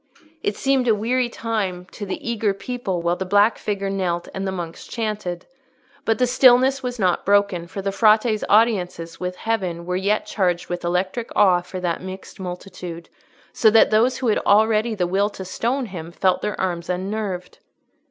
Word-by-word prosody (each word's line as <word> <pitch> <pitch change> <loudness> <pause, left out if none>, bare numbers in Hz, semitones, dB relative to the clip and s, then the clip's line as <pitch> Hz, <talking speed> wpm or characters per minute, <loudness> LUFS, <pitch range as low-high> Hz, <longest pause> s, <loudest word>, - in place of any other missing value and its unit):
It 205 - -2
seemed 270 -2 +1
a 225 - +4
weary 240 +4 0
time 205 -7 -3
to 205 - -7
the 190 - -3
eager 215 -4 0
people 195 -5 -4
while 170 +1 +1
the - - -2
black 205 +4 +3
figure 200 -1 -2
knelt 180 -3 -2
and 195 0 -3
the - - -1
monks 170 -3 -6
chanted. 210 -6 -4 0.6
But 225 - +2
the 255 - +3
stillness 255 +2 +5
was 250 -1 -4
not 185 -5 +1
broken, 200 -4 +2
for 195 +2 -6
the 195 - -1
Frate's 215 +1 +3
audiences 180 -7 +2
with 180 0 -3
Heaven 180 -6 -2
were 180 +1 -2
yet 200 +3 0
charged 180 -4 -1
with 175 0 -4
electric 185 +6 -1
awe 185 -3 +5
for 185 +1 -7
that 175 -2 -1
mixed 190 +1 -9
multitude, 180 -2 -7 0.4
so 220 - +5
that 220 0 +5
those 240 +4 +3
who 255 -3 0
had 215 - +2
already 220 +2 +3
the 180 -3 0
will 195 +4 +1
to 190 -2 -8
stone 245 +8 -1
him 170 -5 -8
felt 185 +1 +1
their 210 - -3
arms 175 -2 -2
unnerved. 190 0 -3
195 Hz, 180 wpm, -22 LUFS, 180-225 Hz, 0.6 s, stillness